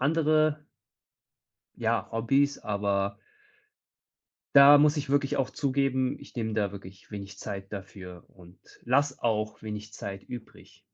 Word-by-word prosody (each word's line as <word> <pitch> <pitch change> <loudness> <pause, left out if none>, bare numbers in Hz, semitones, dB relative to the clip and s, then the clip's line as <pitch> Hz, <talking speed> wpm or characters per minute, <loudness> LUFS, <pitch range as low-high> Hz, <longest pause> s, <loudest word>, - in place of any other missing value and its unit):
andere 155 +1 +2 1.1
ja, - - 0
Hobbys, 135 +5 +1
aber 100 -1 -1 1.4
da 140 +1 +9
muss 150 +1 +4
ich 140 -2 -3
wirklich 145 0 +1
auch 130 - 0
zugeben, 135 -2 0
ich - - -15
nehme 110 -3 -2
da 100 -3 0
wirklich 95 0 -12
wenig 100 -1 -8
Zeit 100 -1 -7
dafür 95 -3 -9
und 90 0 -18 0.2
lass 135 +2 +1
auch 110 -2 -1
wenig 105 0 -7
Zeit 100 -2 -7
übrig. 120 -2 -11
115 Hz, 125 wpm, -28 LUFS, 100-140 Hz, 1.4 s, da